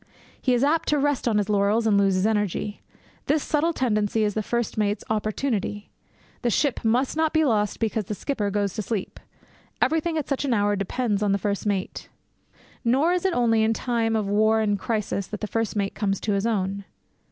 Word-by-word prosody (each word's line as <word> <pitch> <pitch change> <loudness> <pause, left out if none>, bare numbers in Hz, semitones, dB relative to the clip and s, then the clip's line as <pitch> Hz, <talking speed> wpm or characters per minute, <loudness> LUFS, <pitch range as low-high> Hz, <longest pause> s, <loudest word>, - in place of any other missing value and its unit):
He 255 -2 +2
is 240 - +1
apt 320 +3 +2
to 300 - +3
rest 290 -2 0
on 220 -3 +2
his 205 -2 +1
laurels 210 +2 +2
and 215 -2 +3
lose 195 -1 +3
his 185 +2 +1
energy. 210 -1 -1 0.5
This 300 0 +2
subtle 315 +2 +1
tendency 220 -6 0
is 210 -1 +1
the 215 - -1
first 235 +2 -2
mate's 205 -1 0
opportunity. 215 -1 -2 0.5
The 245 - +1
ship 270 +3 0
must 245 +5 +1
not 315 0 +1
be 315 -1 +3
lost 210 -5 +1
because 220 -2 -1
the 210 - -4
skipper 210 -4 -2
goes 200 -1 -1
to - - -3
sleep. 210 -1 -4 0.6
Everything, 325 +1 +1
at 300 - -2
such 275 -1 -1
an 265 -4 +1
hour, 205 0 +2
depends 205 +2 -1
on 205 -2 +2
the - - +2
first 200 +1 -2
mate. 195 -2 -3 0.7
Nor 275 +9 +3
is 360 +1 -1
it 380 - +2
only 225 -2 +3
in 220 +1 +3
time 230 -1 0
of 215 -2 0
war 215 +2 +3
and 215 -2 +1
of 200 - -2
crisis 210 -3 -2
that 210 - -6
the - - -3
first 225 +1 -2
mate 200 -1 -1
comes 195 -2 -1
to 210 - 0
his 200 +3 0
own. 200 -2 -1
220 Hz, 210 wpm, -24 LUFS, 205-250 Hz, 0.7 s, to